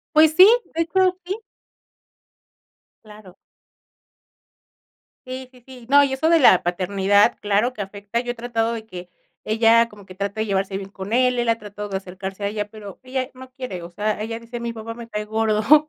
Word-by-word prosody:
Pues 310 0 +7
sí, 370 +1 +10 0.3
de 330 - +3
hecho, 370 +2 +1
sí. 385 +3 -2 1.7
Claro. 210 -3 -14 1.9
Sí, 255 0 -7
sí, 250 -2 -20
sí. 255 -3 -13
No, 285 +1 +6
y 270 - -1
eso 290 +4 +1
de 335 0 +5
la 220 - +6
paternidad, 195 +3 +2
claro 210 +4 +1
que 215 - -11
afecta. 200 +3 -4
Yo 245 0 -3
he - - -13
tratado 230 -1 -1
de 220 -1 -6
que 180 -3 -9 0.4
ella 230 +1 +4
como 210 -3 -15
que 185 - -13
trate 200 +2 -4
de 220 - 0
llevarse 195 -1 -1
bien 195 0 -7
con 195 +2 -5
él, 250 0 +3
él 240 -1 0
ha 230 - +3
tratado 210 -1 -8
de 195 - -3
acercarse 190 +1 -6
a - - +1
ella, 210 0 -3
pero 205 -3 -11
ella 255 +1 -3
no 260 0 -12
quiere, 250 -9 -6
o 170 - -9
sea, 210 +3 -2
ella 225 +1 -4
dice: 235 +1 -8
"Mi 235 0 -4
papá 225 +1 -7
me 235 0 -10
cae 210 -1 -4
gordo". 220 +7 +3
220 Hz, 195 wpm, -22 LUFS, 200-250 Hz, 1.9 s, sí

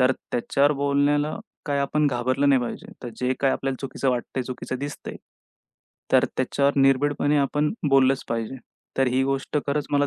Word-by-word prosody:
तर 130 +1 +5 0.2
त्याच्यावर 140 +4 +2
बोलण्याला 145 +3 +1 0.3
काही 140 -1 0
आपण 150 +2 +1
घाबरलं 130 +2 +1
नाही 135 -2 +4
पाहिजे. 120 - -6
तर - - -4
जे 125 0 +1
काही 135 -1 +3
आपल्याला 135 -1 -2
चुकीचं 135 0 -1
वाटतंय, 125 +1 -2
चुकीचं 130 0 -5
दिसतंय, 145 +1 -6 1.0
तर - - +6
त्याच्यावर 140 +2 +1
निर्भिडपणे 145 +2 +3
आपण 145 +2 +1 0.2
बोललंच 135 0 +4
पाहिजे. 115 +2 -3 0.4
तर 135 - +4
ही 130 +1 +1
गोष्ट 135 +2 -1
खरंच 145 0 -1
मला 145 0 +3
135 Hz, 160 wpm, -24 LUFS, 130-145 Hz, 1.0 s, तर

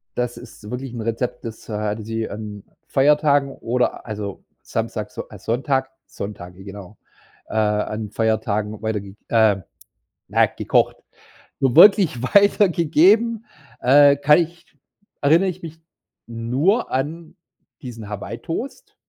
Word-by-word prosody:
das 125 -1 -2
ist 105 - -12
wirklich 125 +1 -5
'n 120 - -5
Rezept, 120 +2 -3
das, 115 0 -9
äh, - - -4
hatte 105 +1 -2
sie 115 0 -3
an 105 -1 -7 0.2
Feiertagen 145 0 +3
oder 125 -1 -2
also, 105 -3 -6 0.2
Samstag, - - -4
So - - -7
äh, - - -12
Sonntag 130 +2 -1 0.2
Sonntage, 95 -2 -8
genau. 100 0 -10 0.5
Äh, - - -10
an 105 0 0
Feiertagen 110 -1 -1
weiterge 105 -3 -4
äh, 110 -3 +4 0.7
na, - - +4
gekocht. - - 0 0.6
Nur 130 -3 +1
wirklich 180 - +6
weitergegeben, 200 - +3 0.4
äh, 140 +2 +6
kann 150 +3 +5
ich 170 0 -4 0.6
erinnere 165 +7 +4
ich 185 0 -7
mich 165 0 -9 0.5
nur 125 - 0
an 155 +5 -3 0.5
diesen 115 -6 -8
Hawaii-Toast, 115 - -6
125 Hz, 125 wpm, -21 LUFS, 110-150 Hz, 0.7 s, wirklich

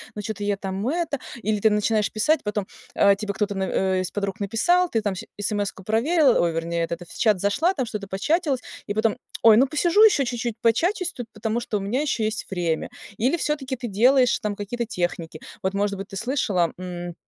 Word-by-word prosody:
но 210 - -4
чё-то 210 0 -5
я 205 -1 0
там 195 +1 -4
это" 325 -3 -1 0.2
Или 215 -1 0
ты 220 - +4
начинаешь 210 0 +1
писать, 305 +9 +1
потом, 210 -2 -2 0.3
э, 200 0 +5
тебе 200 0 -4
кто-то 205 0 -1
н 190 -1 0
из 185 - -4
подруг 200 0 -3
написал, 350 - +2
ты 225 - 0
там 205 -2 -1
щ - - -7
эсэмэску 205 -2 -2
проверила, 260 - +3
ой, 170 - +2
вернее, 165 +1 -2
это 170 +1 -4
в - - -12
чат 215 -4 +3
зашла, 290 - +2
там 260 -7 -2
что-то 210 -3 -6
початилась, 275 - 0 0.2
и 205 - -3
потом: 220 0 +1 0.3
"Ой, 225 -2 +8
ну, 260 - +6
посижу 345 +8 +3
еще 375 -11 +5
чуть-чуть 240 -2 -3
початюсь 345 - +1
тут, 245 -3 -7
потому 220 +2 -2
что 215 - -2
у - - -4
меня 220 +8 -1
еще 265 -7 0
есть 215 0 -2
время". 170 -4 -1 0.3
Или 260 +10 +1
всё-таки 285 -4 -2
ты 240 -1 -5
делаешь 250 +5 +4
там 210 -1 -3
какие-то 230 +4 -4
техники. 175 -5 -3 0.2
Вот, 190 +1 0
может 200 0 0
быть, 195 - -6
ты 195 - -7
слышала, 205 - 0
м, 175 -1 -6
215 Hz, 210 wpm, -24 LUFS, 195-255 Hz, 0.3 s, Ой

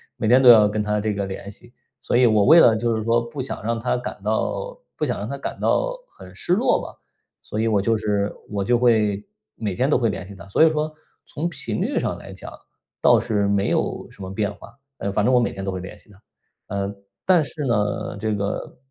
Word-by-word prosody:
每 110 - -2
天 125 +2 +6
都 130 - +5
要 110 -3 +8
跟 105 +1 -1
她 105 0 -1
这 110 0 -1
个 100 0 -2
联 95 +1 -7
系。 120 +4 -16 0.3
所 - - -1
以 125 +1 +5
我 105 -2 +3
为 165 +2 +8
了 115 -8 +6
就 115 +1 0
是 110 - -2
说 115 +1 +3
不 120 +4 -6
想 130 - -5
让 115 +1 -1
她 125 +2 0
感 125 - -7
到 - - -2 0.2
不 - - -4
想 - - -2
让 - - -4
她 - - -4
感 - - -6
到 - - +1
很 - - -14
失 175 - -1
落 220 +7 +3
吧， - - -8 0.5
所 105 - -5
以 115 - +1
我 105 -3 +2
就 115 +2 +1
是 105 -1 -1 0.2
我 100 -1 -2
就 120 +5 +2
会 110 -4 +2 0.3
每 105 -4 -3
天 130 +9 0
都 - - +4
会 120 -2 +1
联 95 -3 -5
系 100 - -11
她。 85 -1 -12
所 100 - +3
以 160 - +7
说 155 0 -2 0.3
从 165 +4 -3
频 - - -4
率 - - 0
上 - - -2
来 - - -11
讲， - - -10 0.5
倒 - - +6
是 100 -2 0
没 100 0 +1
有 - - -1
什 - - -15
么 95 - -6
变 105 +1 -2
化， 115 +5 -15 0.2
呃， 100 - -2
反 100 +1 +1
正 130 - +3
我 125 - +6
每 120 - 0
天 95 0 -6
都 95 - -1
会 95 - -4
联 95 - -9
系 105 - -19
她。 100 0 -20 0.5
呃， 100 0 -3 0.3
但 180 -4 +4
是 150 +1 -6
呢， 105 -4 -1
这 110 0 -1
个， 100 0 -4
110 Hz, 265 characters per minute, -22 LUFS, 100-125 Hz, 0.5 s, 要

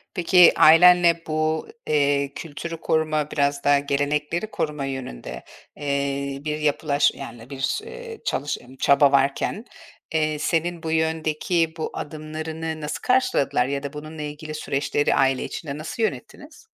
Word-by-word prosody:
Peki, 180 0 +6
ailenle 170 +1 +7
bu, 155 0 -1 0.2
eee, 140 -2 +1
kültürü 165 +1 -6
koruma, 155 -2 0
biraz 140 -1 0
daha 145 0 +4
gelenekleri 150 +7 -1
koruma 150 -3 -2
yönünde, 60 - -6 0.3
eee, 140 -1 -2
bir 150 0 -1
yapılaş 145 -1 +2
yani, 120 -2 -9
bir 135 - -2
eee, 470 -1 -9
çalış 145 +2 -1
emm, 125 +2 -15
çaba 140 +1 +4
varken, 140 - +1 0.5
eee, 155 -1 0
senin 165 +2 -1
bu 160 - -3
yöndeki 160 +1 0
bu 160 - -3
adımlarını 155 +1 -5
nasıl 150 - -4
karşıladılar 140 - +2
ya 140 +1 -3
da 140 +1 -5
bununla 155 +1 -8
ilgili 150 +1 -6
süreçleri 145 0 0
aile 135 -1 +2
içinde 145 -3 -6
nasıl 165 +9 -4
yönettiniz? 295 +8 -5
150 Hz, 135 wpm, -23 LUFS, 140-160 Hz, 0.5 s, ailenle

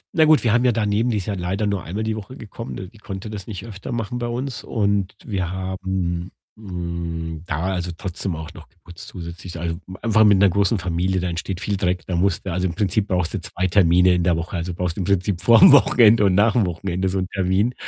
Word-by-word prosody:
Na 160 - +5
gut, 155 -1 +5
wir 115 -3 +2
haben 120 +1 +3
ja 125 - +4
daneben 110 +1 0
die 110 - 0
ist 95 - -3
ja 105 - -2
leider 95 +3 -2
nur 100 -3 -1
einmal 100 +6 -4
die 110 0 -1
Woche 110 +5 -8
gekommen, 115 +2 -8
ne, 95 - -7
die 105 +3 -18
konnte 100 +1 -7
das 100 -3 -7
nicht 105 -1 -7
öfter 100 -4 -8
machen 120 +1 -3
bei 120 - -2
uns 125 0 -4
und 100 -3 -1
wir 95 -5 -2
haben, 95 -1 -3 0.2
hm, 85 -5 -5
da, 85 +6 -1
also, 90 -1 -3
trotzdem 90 0 -3
auch 80 +2 -8
noch 80 -1 -13
geputzt 85 0 -13
zusätzlich. 85 0 -8
Also, 85 0 -3 0.2
einfach 110 -1 +4
mit 105 -2 +6
'ner 100 +1 +5
großen 100 +4 +2
Familie, 95 +1 -1
da 90 0 -2
entsteht 90 +2 -4
viel 100 -1 -1
Dreck, 90 -3 -1
da 90 - -3
musst 90 +1 0
du 95 - -3
also, 90 +1 0
im 85 - -5
Prinzip 100 +2 0
brauchst 90 -4 -1
du - - -3
2 90 - -3
Termine 90 -1 +4
in 90 -1 +1
der 85 -1 +2
Woche, 80 +2 -5
also 85 0 -3
brauchst 90 -2 -3
im - - -1
Prinzip 95 -1 0
vorm 115 +5 +8
Wochenende 115 -6 +6
und 95 -2 +3
nach 105 +2 +4
dem 110 -6 +2
Wochenende 90 +2 -2
so 95 - -2
'n 95 - 0
Termin, 95 +5 +1
95 Hz, 240 wpm, -22 LUFS, 90-105 Hz, 0.2 s, vorm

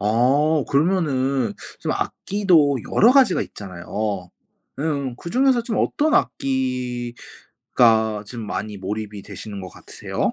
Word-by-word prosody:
어 135 +8 +2
그러면은 140 -5 +1 0.3
좀 - - -1
악기도 175 -9 +2 0.2
여러 235 +4 +6
가지가 260 -9 +4
있잖아요. 95 0 -5 0.5
음 140 -4 -2
그 170 - -8
중에서 255 -1 +3
좀 230 -1 -2
어떤 305 0 +1
악기가 120 -4 0
좀 115 -1 -7
많이 105 +2 -4
몰입이 105 +1 -5
되시는 100 -2 -8
것 95 - -7
같으세요? - - -4
130 Hz, 250 characters per minute, -22 LUFS, 105-160 Hz, 0.5 s, 여러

